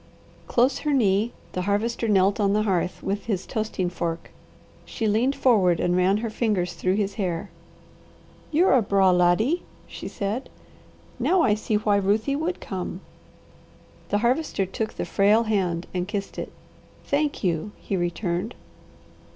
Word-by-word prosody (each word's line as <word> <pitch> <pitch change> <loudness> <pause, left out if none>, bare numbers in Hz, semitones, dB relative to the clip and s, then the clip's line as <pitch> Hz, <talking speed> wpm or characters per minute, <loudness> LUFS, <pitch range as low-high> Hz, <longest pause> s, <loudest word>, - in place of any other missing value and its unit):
Close 250 +3 +2
her 300 -1 -1
knee 215 -2 +2 0.2
the 180 - -3
Harvester 215 +4 0
knelt 200 -1 +3
on 200 -1 +2
the 215 +1 +2
hearth 185 -3 -1
with 200 +1 -2
his 195 -5 -2
toasting 215 -4 -2
fork. 170 -1 -4 0.5
She 225 - -3
leaned 235 +6 +2
forward 205 -11 +3
and 175 0 +1
ran 185 +2 +3
her - - -2
fingers 200 -6 0
through 185 +2 0
his 200 -1 -1
hair. 175 0 -2 1.0
"You're 335 +5 +4
a 260 - +5
braw 195 -2 +3
laddie," 180 - +3 0.2
she - - -8
said. 205 +6 -3 0.7
"Now 365 -2 +3
I 210 - +4
see 215 +1 -1
why 210 -1 +2
Ruthie 210 +7 +1
WOULD 325 +5 -2
come." 185 -1 -5 1.1
The 205 - +2
Harvester 250 -5 +1
took 215 +4 -4
the - - -3
frail 210 +3 +3
hand 185 -6 0
and 180 0 -2
kissed 200 -1 -4
it. - - -5 0.5
"Thank 290 -2 0
you!" 175 +2 -1
he 195 - -3
returned. 175 0 -2
205 Hz, 150 wpm, -25 LUFS, 185-230 Hz, 1.1 s, a